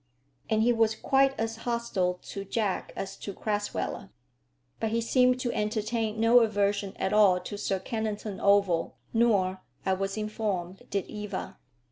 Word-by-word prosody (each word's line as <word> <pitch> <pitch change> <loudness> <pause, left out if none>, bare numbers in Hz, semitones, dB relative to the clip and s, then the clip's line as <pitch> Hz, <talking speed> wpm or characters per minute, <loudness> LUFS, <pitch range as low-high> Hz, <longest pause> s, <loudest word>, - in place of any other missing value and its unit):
And 220 0 +3
he 240 +1 +4
was 225 -1 +2
quite 270 +3 +2
as 225 0 -2
hostile 225 -6 -1
to 200 - -6
Jack 200 -1 -2
as 195 - -5
to 200 - -7
Crasweller. 205 - -3 0.7
But 225 - 0
he 230 +1 +1
seemed 250 +2 +3
to 240 -2 -1
entertain 215 +1 -1
no 230 +2 +6
aversion 205 -3 +1
at 190 - -1
all 200 -4 +6
to 190 - -6
Sir 195 -1 -1
Kennington 215 -1 -3
Oval; 200 -4 +3 0.2
nor, 200 -5 +2 0.2
I 190 - +2
was 195 +2 -2
informed, 205 -4 -3
did 200 -3 -1
Eva. 210 -3 -6
210 Hz, 150 wpm, -28 LUFS, 195-225 Hz, 0.7 s, no